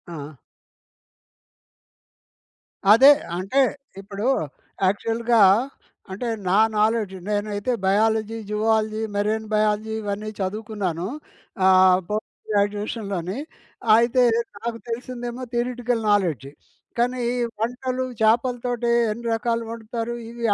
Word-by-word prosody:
ఆ! 145 -2 -8 2.6
అదే 270 +6 +9 0.3
అంటే 195 +10 +1 0.4
ఇప్పుడు 200 +3 -4 0.6
యాక్చువల్‌గా 230 +2 +2 0.7
అంటే, 220 +6 -4 0.2
నా 195 - +3 0.2
నాలెడ్జ్ 215 -2 +1 0.2
నేనైతే 205 +2 -1
బయాలజీ, 220 +2 +2
జువాలజీ, 215 0 +1 0.2
మెరైన్ 215 +2 -1
బయాలజీ 215 +1 +1
ఇవన్నీ 205 +1 -4
చదువుకున్నాను. 195 -3 -3 0.6
ఆహ్, 185 -1 +6
పోస్ట్ 215 +1 -5
గ్రాడ్యుయేషన్‌లోని. 205 -2 -1 0.6
అయితే, 240 +2 +3 0.4
నాకు 235 0 -3
తెలిసిందేమో 245 +1 -5
థియరెటికల్ 245 -1 -1
నాలెడ్జి. 170 - +1 0.5
కానీ 245 0 +1 0.4
వంటలు 255 +2 -2 0.2
చేపలతోటి 240 +1 +1 0.2
ఎన్ని 235 +2 -5
రకాలు 230 +1 -1
వండుతారు 230 +1 -4 0.2
ఇవి 235 0 -5
220 Hz, 90 wpm, -23 LUFS, 205-235 Hz, 2.6 s, అదే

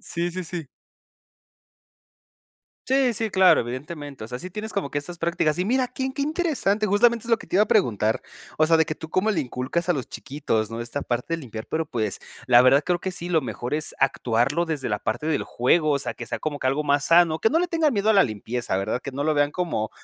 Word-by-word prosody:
Sí, 170 +1 -3
sí, 185 +1 -5
sí. 165 -3 -6 2.2
Sí, 265 -1 +3
sí, 225 0 -1
claro, 190 -2 +5
evidentemente. 140 +1 -6
O - - -9
sea, 125 0 -5
sí 180 - -7
tienes 210 +4 -6
como 195 -9 -2
que - - -5
estas 170 +4 -4
prácticas 165 -2 0
y 180 - +1
mira, 255 +2 +1
qué 265 +1 -3
qué 280 - -2
interesante, 290 - 0
justamente 230 +3 +3
es - - -5
lo 230 - +5
que - - -13
te - - -1
iba 205 - +6
a - - -16
preguntar. 115 - +2 0.3
O 155 - +3
sea, 165 0 +4
de 160 - +3
que 155 - -3
tú 160 0 -10
cómo 190 +6 +1
le 185 -7 +1
inculcas 135 +6 -2
a - - +6
los 135 -7 -4
chiquitos, 115 -6 -2
¿no? 115 +1 -5
Esta 120 +5 -4
parte 125 +7 -2
de - - -1
limpiar 115 -7 -8
pero, 160 +1 -1
pues, 110 -8 -2 0.3
la 120 -1 +7
verdad 135 +3 +5
creo 180 -1 +1
que 190 - -4
sí, 175 -1 -5
lo 165 -3 +2
mejor 120 +2 -4
es 155 0 -2
actuarlo 135 +4 +1
desde 155 -5 -3
la 105 - -1
parte 115 +9 -3
del 160 -2 0
juego, 155 +6 +2
o 140 - +2
sea, 140 - -4
que - - -7
sea - - -4
como 150 -2 -3
que 130 - -2
algo 135 +3 +1
más 145 -1 +1
sano, 165 -2 +4
que 220 - +3
no 320 - +3
le 355 - +1
tengan 325 -4 +2
miedo 205 -1 0
a 220 - +5
la 195 - +7
limpieza, 115 0 -3
¿verdad? 100 +6 -2
Que 140 - -5
no 140 +2 -3
lo 155 +1 +1
vean 145 0 +2
como, 155 -11 -2
155 Hz, 250 wpm, -24 LUFS, 130-190 Hz, 2.2 s, la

